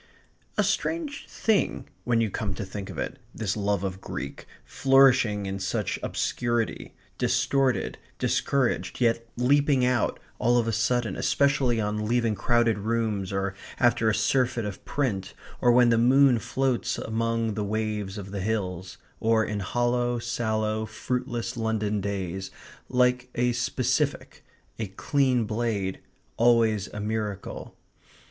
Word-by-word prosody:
A -, -, +4 dB
strange 315 Hz, -4 st, -2 dB
thing 220 Hz, -3 st, 0 dB, 0.2 s
when 120 Hz, -2 st, +2 dB
you 110 Hz, -3 st, 0 dB
come 100 Hz, -2 st, -3 dB
to 100 Hz, -, -4 dB
think 95 Hz, +1 st, -7 dB
of -, -, -8 dB
it -, -, -4 dB, 0.2 s
this 100 Hz, -4 st, -1 dB
love 100 Hz, -2 st, 0 dB
of 95 Hz, 0 st, -4 dB
Greek, 70 Hz, -, -6 dB, 0.2 s
flourishing 130 Hz, -6 st, +4 dB
in 95 Hz, 0 st, -3 dB
such 95 Hz, -, -2 dB
obscurity, 120 Hz, -2 st, -2 dB, 0.2 s
distorted, 130 Hz, +1 st, +1 dB, 0.2 s
discouraged, 135 Hz, -3 st, 0 dB
yet 115 Hz, -1 st, +1 dB
leaping 140 Hz, +1 st, +3 dB
out, 125 Hz, -3 st, +1 dB, 0.2 s
all 120 Hz, +1 st, +3 dB
of 115 Hz, -1 st, +1 dB
a -, -, +1 dB
sudden, 120 Hz, +1 st, 0 dB
especially 135 Hz, -4 st, +2 dB
on 105 Hz, 0 st, -1 dB
leaving 120 Hz, -1 st, +2 dB
crowded 115 Hz, 0 st, +2 dB
rooms, 110 Hz, -3 st, -1 dB
or 95 Hz, 0 st, -1 dB, 0.3 s
after 120 Hz, -2 st, +3 dB
a 110 Hz, -, +1 dB
surfeit 120 Hz, +1 st, +1 dB
of 100 Hz, -2 st, -6 dB
print, 105 Hz, -10 st, -2 dB, 0.3 s
or 120 Hz, -, +5 dB
when 120 Hz, 0 st, +6 dB
the 115 Hz, -1 st, +4 dB
moon 130 Hz, 0 st, +5 dB
floats 130 Hz, +1 st, -1 dB
among 115 Hz, 0 st, -1 dB
the 105 Hz, -, -2 dB
waves 105 Hz, -1 st, -2 dB
of 100 Hz, -1 st, -7 dB
the 100 Hz, -1 st, -3 dB
hills, 95 Hz, -3 st, -3 dB, 0.2 s
or 110 Hz, 0 st, +3 dB
in 105 Hz, -1 st, -3 dB
hollow, 120 Hz, +4 st, 0 dB
sallow, 110 Hz, -2 st, -1 dB
fruitless 120 Hz, +2 st, -3 dB
London 110 Hz, -2 st, -1 dB
days, 95 Hz, -1 st, -3 dB, 0.4 s
like 125 Hz, 0 st, +2 dB
a 125 Hz, 0 st, +2 dB
specific; 130 Hz, +4 st, -1 dB, 0.4 s
a 110 Hz, -, -2 dB
clean 130 Hz, +4 st, +1 dB
blade; 105 Hz, -4 st, -2 dB, 0.4 s
always 115 Hz, -4 st, +3 dB
a 105 Hz, -, -8 dB
miracle. 105 Hz, -2 st, -4 dB
115 Hz, 140 wpm, -26 LUFS, 105-125 Hz, 0.4 s, when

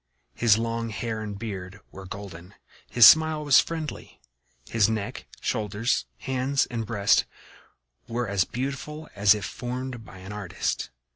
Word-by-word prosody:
His 115 Hz, -3 st, +4 dB
long 115 Hz, 0 st, -2 dB
hair 110 Hz, 0 st, -4 dB
and 105 Hz, -2 st, -5 dB
beard 100 Hz, -3 st, -6 dB
were 95 Hz, 0 st, -10 dB
golden; 95 Hz, -2 st, -9 dB, 0.3 s
his 120 Hz, -2 st, +7 dB
smile 160 Hz, +1 st, +6 dB
was 145 Hz, -2 st, +7 dB
friendly; 160 Hz, -2 st, -4 dB, 0.5 s
his 110 Hz, -2 st, +3 dB
neck, 110 Hz, -2 st, -4 dB
shoulders, 105 Hz, -, -1 dB
hands 130 Hz, -, 0 dB
and 115 Hz, -3 st, -3 dB
breast 100 Hz, -2 st, +3 dB, 0.8 s
were 120 Hz, 0 st, -2 dB
as 100 Hz, -2 st, +2 dB
beautiful 140 Hz, -, -5 dB
as 100 Hz, 0 st, +5 dB
if 105 Hz, -1 st, -4 dB
formed 125 Hz, +1 st, -5 dB
by 95 Hz, -, -13 dB
an 95 Hz, +2 st, -9 dB
artist. 95 Hz, -4 st, -3 dB
110 Hz, 140 wpm, -26 LUFS, 100-125 Hz, 0.8 s, his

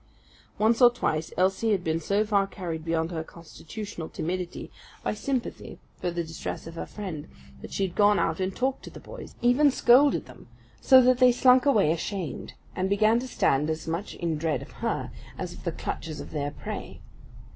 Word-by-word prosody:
Once 225 Hz, +3 st, +2 dB
or 245 Hz, -, +9 dB
twice 160 Hz, -10 st, -2 dB
Elsie 195 Hz, +4 st, +2 dB
had 190 Hz, -3 st, -1 dB
been 160 Hz, 0 st, 0 dB
so 200 Hz, +6 st, +1 dB
far 200 Hz, -2 st, +2 dB
carried 170 Hz, -5 st, -5 dB
beyond 165 Hz, 0 st, -1 dB
her 160 Hz, -2 st, -3 dB
constitutional 170 Hz, +2 st, -8 dB
timidity, 180 Hz, +1 st, -4 dB, 0.3 s
by -, -, 0 dB
sympathy 250 Hz, +3 st, -4 dB, 0.2 s
for 180 Hz, -, -2 dB
the 170 Hz, 0 st, -2 dB
distress 160 Hz, 0 st, -6 dB
of 165 Hz, -, -8 dB
her 165 Hz, -, -6 dB
friend, 180 Hz, -8 st, -6 dB, 0.3 s
that -, -, -9 dB
she 195 Hz, -, 0 dB
had 180 Hz, -, -7 dB
gone 205 Hz, 0 st, +5 dB
out 160 Hz, +2 st, 0 dB
and 185 Hz, 0 st, -2 dB
talked 265 Hz, +1 st, -1 dB
to -, -, -8 dB
the -, -, -11 dB
boys -, -, -10 dB
even 255 Hz, +5 st, +5 dB
scolded 270 Hz, +2 st, +4 dB
them, -, -, -15 dB, 0.3 s
so 260 Hz, -2 st, +7 dB
that 255 Hz, 0 st, +4 dB
they 255 Hz, -1 st, +7 dB
slunk 255 Hz, +2 st, +5 dB
away 210 Hz, -, +4 dB
ashamed, 170 Hz, 0 st, -4 dB, 0.2 s
and 190 Hz, +1 st, -1 dB
began 215 Hz, +3 st, +3 dB
to 255 Hz, -, -5 dB
stand 150 Hz, -, +1 dB
as 160 Hz, 0 st, -3 dB
much 170 Hz, +5 st, -3 dB
in 165 Hz, -3 st, -2 dB
dread 160 Hz, -1 st, -1 dB
of -, -, -14 dB
her -, -, -3 dB, 0.3 s
as -, -, -5 dB
of -, -, -13 dB
the -, -, 0 dB
clutches 155 Hz, -2 st, -5 dB
of -, -, -8 dB
their 145 Hz, -2 st, -2 dB
prey. 145 Hz, -, -7 dB
190 Hz, 195 wpm, -27 LUFS, 165-230 Hz, 0.3 s, or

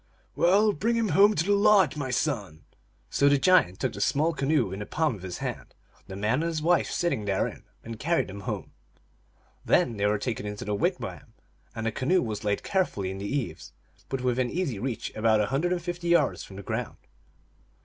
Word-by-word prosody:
"Well, 205 Hz, +4 st, +4 dB
bring 230 Hz, +9 st, 0 dB
him 230 Hz, -2 st, +1 dB
home 205 Hz, +3 st, +5 dB
to 155 Hz, -, +1 dB
the 205 Hz, -, +1 dB
lodge, 205 Hz, -3 st, +4 dB
my 145 Hz, -3 st, -3 dB
son! 110 Hz, -, -2 dB, 0.2 s
" -, -, -38 dB
So 140 Hz, -, +4 dB
the 145 Hz, -, +4 dB
giant 135 Hz, -, +3 dB
took -, -, -1 dB
the 100 Hz, -, -6 dB
small 155 Hz, +9 st, +2 dB
canoe 140 Hz, -7 st, +1 dB
in 95 Hz, -, -5 dB
the 105 Hz, -, -6 dB
palm 155 Hz, -3 st, 0 dB
of 100 Hz, -, -9 dB
his 90 Hz, -1 st, -6 dB
hand, -, -, -6 dB, 0.3 s
the 95 Hz, -, -7 dB
man 110 Hz, +8 st, 0 dB
and 165 Hz, -, 0 dB
his 160 Hz, -2 st, -2 dB
wife 170 Hz, +3 st, +2 dB
sitting 170 Hz, -12 st, -1 dB
therein, 95 Hz, -1 st, -2 dB, 0.2 s
and 115 Hz, -1 st, -8 dB
carried 170 Hz, +2 st, +1 dB
them 100 Hz, +1 st, -8 dB
home. 100 Hz, -, -5 dB, 0.9 s
Then 115 Hz, -, +2 dB
they 100 Hz, 0 st, +1 dB
were 105 Hz, +1 st, +2 dB
taken 110 Hz, -1 st, -3 dB
into 105 Hz, 0 st, -6 dB
the 105 Hz, -, -2 dB
wigwam, 100 Hz, -, -3 dB, 0.4 s
and 115 Hz, -, -4 dB
the 115 Hz, -, +1 dB
canoe 175 Hz, +11 st, +1 dB
was 110 Hz, -3 st, -4 dB
laid 105 Hz, -1 st, -1 dB
carefully 105 Hz, -, -1 dB
in 95 Hz, -, -6 dB
the 100 Hz, -, -4 dB
eaves, 135 Hz, 0 st, -4 dB, 0.4 s
but 135 Hz, -1 st, -2 dB
within 125 Hz, 0 st, 0 dB
easy 150 Hz, -, -2 dB
reach, 125 Hz, 0 st, -4 dB
about 110 Hz, 0 st, +3 dB
a 105 Hz, -, +2 dB
hundred 165 Hz, +6 st, +1 dB
and 175 Hz, -2 st, -1 dB
fifty 175 Hz, -1 st, -4 dB
yards 170 Hz, -5 st, +2 dB
from 95 Hz, -, -12 dB
the 100 Hz, -, -8 dB
ground. -, -, -4 dB
130 Hz, 210 wpm, -27 LUFS, 105-170 Hz, 0.9 s, home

